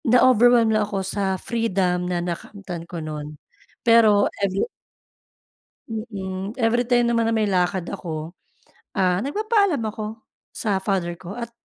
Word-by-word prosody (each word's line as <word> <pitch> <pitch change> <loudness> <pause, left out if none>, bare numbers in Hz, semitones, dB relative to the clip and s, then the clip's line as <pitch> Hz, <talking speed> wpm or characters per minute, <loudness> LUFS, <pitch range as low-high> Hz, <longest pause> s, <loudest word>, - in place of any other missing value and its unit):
Na-overwhelm 245 -2 +5
lang 215 - +3
ako 195 -2 -2
sa, 195 -1 -1
freedom 185 -5 0
na 180 - 0
nakamtan 175 -1 -6
ko 175 - -6
nun, 150 -1 -6 0.5
pero, 225 -3 +6 0.2
every 195 -1 +1 1.2
Mm, 200 -3 -5
everytime 240 +1 +3
naman 230 -1 +2
na - - +1
may 220 -2 +2
lakad 180 -1 +1
ako, 160 0 -6 0.6
ah, 180 -1 +2
nagpapaalam 405 - +1
ako, 215 +1 -6 0.3
sa 205 -3 0
father 190 -3 -1
ko 185 +2 -8
at 235 0 -5
200 Hz, 130 wpm, -23 LUFS, 180-230 Hz, 1.2 s, pero